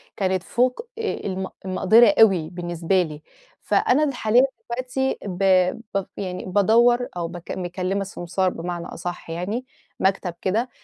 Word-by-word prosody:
كانت 185 Hz, -2 st, 0 dB
فوق 255 Hz, -, 0 dB
آآ 445 Hz, -, -1 dB
الم 190 Hz, 0 st, -3 dB, 0.2 s
المقدَرة 205 Hz, +4 st, +5 dB
أوي 180 Hz, -7 st, +5 dB
بالنسبة 175 Hz, +1 st, 0 dB
لي. 155 Hz, -3 st, -5 dB, 0.4 s
فأنا 295 Hz, +5 st, +2 dB
اللي 280 Hz, -4 st, 0 dB
حاليًا 225 Hz, +3 st, +4 dB, 0.3 s
دلوقتي 255 Hz, +2 st, -1 dB
ب 195 Hz, -1 st, -3 dB, 0.5 s
ب 195 Hz, -, 0 dB
يعني 185 Hz, -2 st, -4 dB
بادوّر، 235 Hz, +6 st, +4 dB
أو 170 Hz, -1 st, -2 dB
بك 175 Hz, 0 st, -8 dB
مكلّمة 185 Hz, +2 st, -2 dB
سمسار 185 Hz, 0 st, -1 dB
بمعنى 175 Hz, 0 st, -5 dB
أصح 175 Hz, -1 st, -6 dB
يعني، 200 Hz, +10 st, -3 dB, 0.3 s
مكتَب 190 Hz, -2 st, 0 dB
كده، 225 Hz, +7 st, 0 dB
190 Hz, 140 wpm, -23 LUFS, 175-235 Hz, 0.5 s, المقدَرة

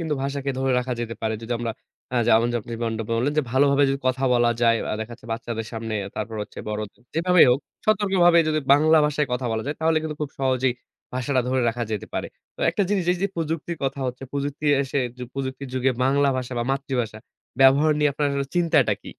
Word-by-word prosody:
কিন্তু 160 Hz, -3 st, -1 dB
ভাষাকে 140 Hz, 0 st, -2 dB
ধরে 135 Hz, 0 st, +1 dB
রাখা 125 Hz, 0 st, -2 dB
যেতে 115 Hz, -1 st, -4 dB
পারে। 110 Hz, 0 st, 0 dB
যদি 115 Hz, -, -4 dB
আমরা 115 Hz, -1 st, -2 dB, 0.4 s
আ -, -, +1 dB
যেমন 115 Hz, +1 st, +5 dB
যে, 120 Hz, -, +1 dB
আপনি 115 Hz, -, -9 dB
যেমনটা 115 Hz, -1 st, -2 dB
বললেন 125 Hz, +6 st, +1 dB
যে 155 Hz, -, +4 dB
ভালোভাবে 140 Hz, +1 st, +4 dB
যদি 135 Hz, 0 st, 0 dB
কথা 130 Hz, +1 st, +1 dB
বলা 120 Hz, -1 st, +3 dB
যায় 115 Hz, -1 st, +5 dB, 0.2 s
আ -, -, 0 dB
দেখা 110 Hz, +1 st, -5 dB
যাচ্ছে 115 Hz, -, -17 dB
বাচ্চাদের 115 Hz, -1 st, -4 dB
সামনে, 115 Hz, -1 st, -4 dB, 0.2 s
তারপর 110 Hz, +1 st, -4 dB
হচ্ছে -, -, -11 dB
বড়দের, 105 Hz, +2 st, -5 dB
যেভাবেই 180 Hz, +2 st, +5 dB
হোক 125 Hz, +3 st, +2 dB, 0.3 s
সতর্কভাবে 190 Hz, -5 st, +4 dB
যদি 155 Hz, 0 st, +1 dB
বাংলা 155 Hz, +3 st, +5 dB
ভাষায় 150 Hz, 0 st, 0 dB
কথা 125 Hz, 0 st, -1 dB
বলা 110 Hz, 0 st, -1 dB
যায় 145 Hz, -, -3 dB
তাহলে 160 Hz, 0 st, +3 dB
কিন্তু 155 Hz, -1 st, -4 dB
খুব 150 Hz, -, -2 dB
সহজেই 130 Hz, -2 st, +1 dB, 0.4 s
ভাষাটা 130 Hz, +1 st, +1 dB
ধরে 130 Hz, -1 st, +1 dB
রাখা 120 Hz, +1 st, -2 dB
যেতে 105 Hz, -, -3 dB
পারে। -, -, -2 dB, 0.3 s
তো -, -, -11 dB
একটা 205 Hz, -, 0 dB
জিনিস, 195 Hz, -3 st, +1 dB
এই -, -, -2 dB
যে 200 Hz, -, +3 dB
প্রযুক্তির 165 Hz, 0 st, -3 dB
কথা 135 Hz, +1 st, -2 dB
হচ্ছে, 125 Hz, +1 st, -5 dB
প্রযুক্তি 145 Hz, +1 st, -3 dB, 0.2 s
এসে 135 Hz, +1 st, -2 dB, 0.4 s
প্রযুক্তির 135 Hz, 0 st, -4 dB
যুগে 130 Hz, +1 st, +2 dB
বাংলা 140 Hz, +1 st, +3 dB
ভাষা 130 Hz, 0 st, -4 dB
বা 120 Hz, -, 0 dB
মাতৃভাষা 125 Hz, -5 st, -2 dB, 0.4 s
ব্যবহার 140 Hz, +4 st, +6 dB
নিয়ে 150 Hz, -1 st, +3 dB
আপনার 145 Hz, 0 st, 0 dB, 0.2 s
চিন্তাটা 160 Hz, -10 st, +3 dB
কি? -, -, -10 dB
135 Hz, 210 wpm, -24 LUFS, 120-150 Hz, 0.4 s, ব্যবহার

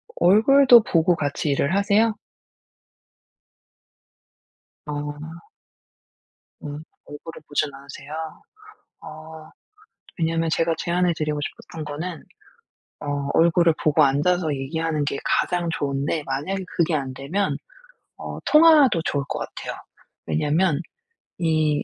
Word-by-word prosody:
얼굴도 235 Hz, +6 st, +6 dB
보고 170 Hz, -1 st, +2 dB
같이 145 Hz, 0 st, -2 dB
일을 140 Hz, +5 st, +1 dB
하세요? 210 Hz, +2 st, +2 dB, 2.7 s
아. 150 Hz, +3 st, -7 dB, 1.1 s
음. 145 Hz, 0 st, -6 dB, 0.2 s
얼굴을 150 Hz, +2 st, -10 dB
보진 145 Hz, 0 st, -1 dB
않으세요? 140 Hz, +1 st, -11 dB, 0.9 s
어. 155 Hz, 0 st, -11 dB, 0.7 s
왜냐하면 165 Hz, 0 st, 0 dB
제가 165 Hz, +1 st, +1 dB
제안해 175 Hz, 0 st, +1 dB
드리고 150 Hz, -1 st, -2 dB
싶었던 155 Hz, +2 st, -7 dB
거는 160 Hz, +3 st, -5 dB, 0.8 s
어 145 Hz, -1 st, -3 dB
얼굴을 170 Hz, 0 st, +4 dB
보고 155 Hz, 0 st, +4 dB
앉아서 155 Hz, +4 st, +2 dB
얘기하는 155 Hz, +2 st, -2 dB
게 140 Hz, -, -2 dB
가장 175 Hz, -2 st, 0 dB
좋은데 145 Hz, +2 st, -2 dB
만약에 170 Hz, +9 st, -3 dB
그게 165 Hz, -1 st, +2 dB
안되면 140 Hz, +8 st, -2 dB, 0.6 s
어 -, -, -7 dB
통화도 300 Hz, -, +6 dB
좋을 140 Hz, -1 st, -1 dB
것 -, -, -3 dB
같아요. -, -, -7 dB, 0.5 s
왜냐하면 150 Hz, -, +1 dB, 0.6 s
이 155 Hz, -3 st, +1 dB
160 Hz, 230 characters per minute, -23 LUFS, 145-175 Hz, 2.7 s, 얼굴도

